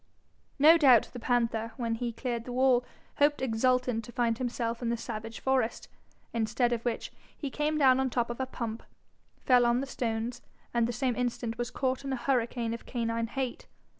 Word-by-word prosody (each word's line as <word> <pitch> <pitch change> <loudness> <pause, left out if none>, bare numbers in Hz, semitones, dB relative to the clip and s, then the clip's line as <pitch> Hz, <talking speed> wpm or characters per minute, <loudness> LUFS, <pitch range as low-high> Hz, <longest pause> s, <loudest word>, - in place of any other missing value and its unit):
No 315 +4 +7
doubt 255 -7 +6
the 245 - -6
panther, 230 -2 0
when 230 -3 -1
he 235 +1 -2
cleared 235 0 -4
the 250 - -6
wall, 250 0 +3 0.3
hoped 290 0 +3
exultant 250 -1 +1
to 240 - -10
find 235 -2 0
himself 240 -2 -2
in 235 - -1
the 235 - 0
savage 225 -1 -6
forest, 260 -4 0 0.4
instead 230 +2 +1
of 235 -1 -3
which 240 -2 -2 0.3
he 280 -3 -4
came 300 +2 0
down 265 -3 +5
on 265 - +2
the 250 - -7
top 240 -1 +1
of 240 - -7
a 260 - -1
pump, 230 -3 -5 0.6
fell 250 -2 +6
on 240 +1 +3
the 270 - -2
stones, 240 -2 -3 0.3
and 235 -1 +2
the - - -1
same 245 0 -1
instant 240 -2 -2
was 240 -1 -1
caught 260 0 -1
in 275 - -4
a - - +1
hurricane 240 -2 0
of 230 - -8
canine 230 -1 -1
hate. 255 +1 -4
240 Hz, 195 wpm, -29 LUFS, 230-260 Hz, 0.6 s, No